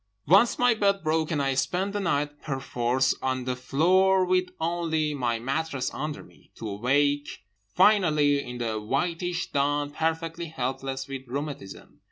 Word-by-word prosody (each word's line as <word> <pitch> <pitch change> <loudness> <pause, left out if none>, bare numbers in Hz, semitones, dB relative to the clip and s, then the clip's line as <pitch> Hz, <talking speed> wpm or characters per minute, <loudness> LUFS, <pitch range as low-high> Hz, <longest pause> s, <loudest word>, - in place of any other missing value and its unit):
Once 195 - +5
my 245 -1 +4
bed 200 -3 +1
broke, 160 0 +1
and 155 -4 -1
I 135 0 +1
spent 180 +9 -1
the 205 - -1
night 150 -5 -1
perforce 130 -2 0
on 130 -1 -1
the 125 0 -2
floor 185 +9 +3
with 185 0 +2
only 160 -2 0
my 120 -4 -1
mattress 135 +3 -2
under 150 +4 -4
me; - - -21
to 115 - -7
awake 140 +8 0 0.3
finally 150 -9 +4
in 125 0 -7
the 110 -3 -2
whitish 170 +9 -2
dawn 145 +1 0
perfectly 165 +2 -2
helpless 135 -2 -4
with 135 -1 -7
rheumatism. 140 -6 -6
145 Hz, 150 wpm, -26 LUFS, 130-170 Hz, 0.3 s, Once